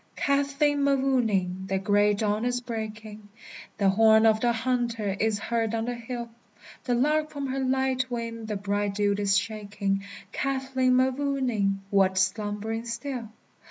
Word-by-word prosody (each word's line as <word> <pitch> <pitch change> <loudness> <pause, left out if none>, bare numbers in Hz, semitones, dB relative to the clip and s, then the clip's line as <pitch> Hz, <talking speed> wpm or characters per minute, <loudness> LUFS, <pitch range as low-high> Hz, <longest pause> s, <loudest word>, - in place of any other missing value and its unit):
Kathleen 280 +1 +1
Mavourneen! 225 -10 +1
the 190 0 0
gray 205 +1 +3
dawn 210 +1 0
is 245 0 0
breaking, 220 -3 -7 0.5
The 200 -2 +3
horn 220 +2 +5
of 220 -1 +4
the 240 +1 +2
hunter 230 -4 -1
is 220 -1 +1
heard 225 +1 -1
on 225 0 -1
the 245 - -2
hill; 235 0 -6 0.6
The 245 - +1
lark 305 +5 +2
from 285 -2 -5
her 270 0 -2
light 260 -1 0
wing 230 -2 -4
the 215 - -2
bright 200 0 -1
dew 205 0 +2
is 200 -1 +3
shaking, 205 -2 -2 0.3
Kathleen 265 -1 0
Mavourneen! 255 -7 +1
what, 190 -1 +3
slumbering 210 +4 -1
still? 235 0 -5
225 Hz, 145 wpm, -27 LUFS, 205-255 Hz, 0.6 s, horn